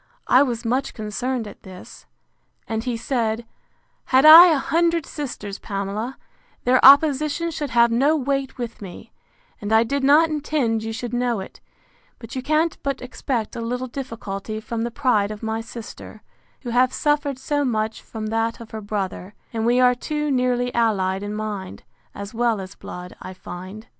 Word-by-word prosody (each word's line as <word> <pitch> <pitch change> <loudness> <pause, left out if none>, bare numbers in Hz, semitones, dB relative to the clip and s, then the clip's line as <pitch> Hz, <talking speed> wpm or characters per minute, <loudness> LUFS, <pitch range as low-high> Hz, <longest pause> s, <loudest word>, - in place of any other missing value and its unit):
I 255 - +5
was 240 -4 -1
much 255 +4 -1
concerned 230 +3 -3
at - - -12
this: 185 -2 -13 0.6
And 225 +1 -3
he 245 -2 -1
said, 230 -2 -1 0.6
Had 260 +3 +4
I 325 +3 +12
a 320 -4 +3
hundred 335 +2 +1
sisters, 240 -9 -6
Pamela, 205 +5 -4 0.5
their 255 +1 +3
opposition 300 +4 +5
should 295 -2 -4
have 235 0 +4
no 275 +7 +3
weight 275 -1 -2
with 235 -3 -6
me: 185 -3 -10 0.5
and 205 +1 -4
I 220 +1 +5
did 275 +4 -2
not 295 +4 +6
intend 290 -7 -1
you 225 0 -4
should 240 +2 -5
know 245 -3 0
it; 190 - -10 0.6
but 230 - -10
you 260 - -2
can't 310 +4 0
but 280 -1 -2
expect 250 -2 -4
a 235 - -4
little 250 +2 -3
difficulty 225 -5 -6
from 225 +1 -4
the 235 - -1
pride 235 -5 +1
of 215 +1 -8
my 220 0 -2
sister, 225 -1 -10 0.4
who 245 - -5
have 250 +2 +3
suffered 295 -2 0
so 290 +2 -1
much 220 -4 -1
from 220 -1 -7
that 225 +1 -1
of 230 -1 -11
her 220 - -6
brother; 200 -1 -4 0.2
and 225 0 -1
we 245 +1 +3
are 250 0 +5
too 300 +3 -3
nearly 250 -1 0
allied 195 -5 +1
in 205 +1 -4
mind, 210 -3 -5 0.3
as 200 +2 -7
well 230 -2 +1
as 190 0 -8
blood, 180 0 -9
I 185 - -8
find. 185 +4 -9
235 Hz, 175 wpm, -22 LUFS, 215-270 Hz, 0.6 s, I